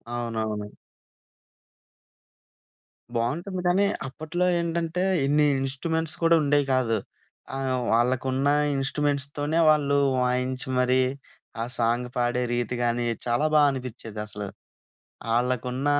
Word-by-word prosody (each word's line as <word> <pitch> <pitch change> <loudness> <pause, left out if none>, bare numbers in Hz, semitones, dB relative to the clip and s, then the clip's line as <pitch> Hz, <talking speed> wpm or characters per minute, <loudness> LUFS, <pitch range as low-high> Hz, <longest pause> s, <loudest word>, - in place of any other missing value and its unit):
అవునవును. 110 -3 -3 2.4
బాగుంటుంది 175 - -2
కానీ 190 +3 +3 0.2
అప్పట్లో 155 +6 -2
ఏంటంటే 170 +1 -1 0.2
ఇన్ని 150 +2 +3
ఇన్‌స్ట్రుమెంట్స్ 155 +4 0
కూడా 165 0 +5
ఉండేవి 145 0 +2
కాదు. 115 -4 +2 0.6
ఆహ్, 130 -2 -1
వాళ్ళకున్న 130 +3 +1 0.3
ఇన్‌స్ట్రుమెంట్స్‌తోనే 145 +2 0
వాళ్ళు 140 -2 +3 0.2
వాయించి 125 +2 0
మరి 125 +1 +3 0.6
ఆ - - +1
సాంగ్ 120 +1 0
పాడే 120 0 +1
రీతి 120 0 -1
కానీ 120 0 +1 0.2
చాలా 120 +5 +1
బా 150 - +7
అనిపించేదసలు. 110 -5 -6 0.9
ఆళ్ళకున్న 125 +2 -1
130 Hz, 95 wpm, -25 LUFS, 120-150 Hz, 2.4 s, బా